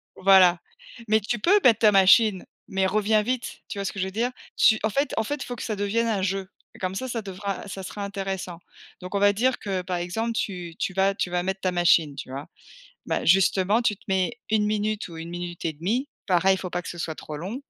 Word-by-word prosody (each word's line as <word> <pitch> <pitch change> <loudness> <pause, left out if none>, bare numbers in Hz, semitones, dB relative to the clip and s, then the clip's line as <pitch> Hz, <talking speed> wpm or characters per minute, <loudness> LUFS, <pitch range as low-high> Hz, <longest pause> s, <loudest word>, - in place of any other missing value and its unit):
Voilà, 185 -2 +6 0.5
mais 215 +1 +4
tu 225 +3 -3
peux 400 - +4
mettre 230 -4 +5
ta 215 -2 +6
machine, 195 0 +5 0.2
mais 190 0 0
reviens 215 +2 +2
vite, 245 +2 -3
tu 205 - -7
vois 200 - -3
ce - - -1
que 195 - -8
je 185 - 0
veux 190 - -5
dire? 235 +5 -1 0.3
Tu 220 -1 +5
en 220 - +2
fait 280 +7 -1
en - - +2
fait 290 +7 -2
il - - -9
faut 245 - -5
que - - -7
ça 215 - -2
devienne 205 +3 0
un 205 -4 0
jeu. 190 0 -2 0.3
Comme 185 0 -2
ça, 260 +5 -3
ça 230 -2 -3
devra 200 +1 -5
ça 190 0 -7
sera 200 +2 -6
intéressant. 195 -3 -4 0.4
Donc 180 +2 -6
on - - +2
va 205 0 +5
dire 250 +5 +1
que 190 -3 -2
par 180 0 -3
exemple, 225 +7 -2
tu 180 -6 -4
tu 190 - -2
vas 195 +1 +2
tu 180 - -2
vas 175 0 -1
mettre 190 +1 -3
ta 185 - 0
machine, 165 -4 +3
tu - - -8
vois? 140 +2 -6 0.6
Bah, - - -1
justement, 195 +5 +3
tu 210 -3 +1
te - - -25
mets 190 +3 +1 0.2
1 215 -1 +2
minute 210 -1 -1
ou 165 - -10
1 165 +1 -7
minute 175 0 -6
et 160 - 0
demie, 220 - -2 0.2
pareil, 190 +1 +4
il - - -4
faut 185 - -6
pas 175 0 -3
que - - -9
ce 175 - -7
soit 160 -1 -3
trop 150 -1 -8
long, 190 +10 -5
195 Hz, 250 wpm, -25 LUFS, 180-215 Hz, 0.6 s, Voilà